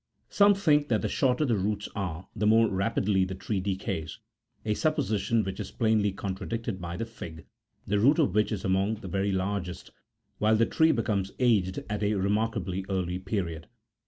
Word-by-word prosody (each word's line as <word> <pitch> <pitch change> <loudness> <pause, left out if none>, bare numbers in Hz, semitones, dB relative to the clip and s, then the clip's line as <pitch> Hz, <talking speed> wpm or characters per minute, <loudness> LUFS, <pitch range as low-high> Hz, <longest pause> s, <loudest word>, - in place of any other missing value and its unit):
Some 205 0 +5
think 150 -6 +3
that 110 -6 +1
the - - +1
shorter 130 +2 +1
the 120 -5 +2
roots 105 +1 -1
are, 90 -4 -4
the 105 0 +1
more 115 +1 +5
rapidly 95 -1 +1
the 95 0 -3
tree 95 +2 -2
decays; 95 -5 -3 0.5
a 105 - +1
sup 155 +7 +1
position 110 -4 0
which 95 +1 -5
is 100 - -4
plainly 110 -3 +1
contradicted 100 +2 -4
by 85 0 -5
the 115 - -2
fig, 85 -8 -10 0.4
the 105 +1 +1
root 140 +9 +5
of 145 - +2
which 105 +1 +2
is 100 -4 -3
among 95 +3 +1
the 105 -3 -9
very 100 +2 0
largest, 95 -1 -3 0.5
while 110 +1 +4
the 115 +1 +4
tree 160 +5 +3
becomes 100 -6 -1
aged 105 -7 +2
at 105 0 -3
a 105 0 +1
remarkably 100 -1 -1
early 90 -2 -1
period. 90 -5 -3
105 Hz, 185 wpm, -28 LUFS, 95-115 Hz, 0.5 s, Some